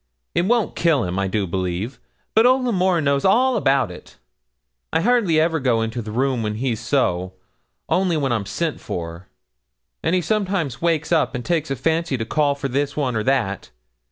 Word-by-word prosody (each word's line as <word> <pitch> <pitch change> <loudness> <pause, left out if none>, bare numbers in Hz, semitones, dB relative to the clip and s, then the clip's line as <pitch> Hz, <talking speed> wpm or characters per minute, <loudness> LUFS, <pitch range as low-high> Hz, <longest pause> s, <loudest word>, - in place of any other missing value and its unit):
It 175 - +1
won't 235 -2 +1
kill 160 -7 +2
him, 90 +1 -2
I 100 - 0
do 100 +1 -1
believe; 95 +6 -3 0.3
but 225 +2 +5
old 255 0 +3
L'Amour 185 -7 +2
knows 140 -1 +1
all 250 +6 +4
about 135 -7 +2
it. 90 - -13 0.7
I 160 - +1
hardly 205 -7 +3
ever 160 0 +2
go 120 -4 +1
into 115 +2 -3
the 110 - -7
room 130 +2 0
when 105 -1 -2
he's 115 -1 -2
so, 95 -7 0 0.5
only 180 -3 +1
when 135 -3 0
I'm 110 -4 -1
sent 155 +9 -2
for; 85 +1 -6 0.7
and 165 - +1
he 180 - +2
sometimes 190 - -1
wakes 165 -2 0
up 160 -4 +2
and 125 - -5
takes 165 -3 0
a 135 - -1
fancy 160 0 0
to 115 - -3
call 145 +3 +1
for 140 0 -3
this 140 +2 -2
one 130 -5 0
or 110 - +1
that. 115 - 0
140 Hz, 190 wpm, -21 LUFS, 115-170 Hz, 0.7 s, but